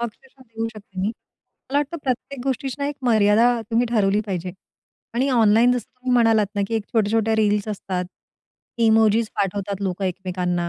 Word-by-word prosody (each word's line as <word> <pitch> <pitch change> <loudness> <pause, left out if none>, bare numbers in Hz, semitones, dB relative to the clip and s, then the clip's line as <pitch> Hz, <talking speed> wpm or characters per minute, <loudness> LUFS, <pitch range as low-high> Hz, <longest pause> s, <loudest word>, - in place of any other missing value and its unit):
अक्षरशः 260 +3 -8
देऊ 225 -2 -5
शकते 205 -3 -12
मी. 195 - 0
मला 265 +4 -7
वाटतं 295 +3 -2
प्रत्येक 260 +1 -3
गोष्टीची 270 0 -2
ना, 280 - -1
एक 290 - -5
मर्यादा 220 -1 +4 0.2
तुम्ही 235 +2 +2
ठरवली 210 -3 +2
पाहिजे 180 -2 -3 0.6
आणि 260 +3 +1
ऑनलाईन 230 0 +4
जसं 250 -1 -1
तुम्ही 255 0 -2
म्हणालात 225 -3 +4
ना, 205 - -1
की 230 - -2
एक 220 -2 -1
छोट्या-छोट्या 220 0 +2
रील्स 210 -1 +1
असतात. 190 -3 -3 0.7
इमोजिस 220 -1 +4
पाठवतात 200 0 -2
लोकं 190 0 -2
एकमेकांना 180 -1 -2
220 Hz, 165 wpm, -22 LUFS, 200-240 Hz, 0.7 s, मर्यादा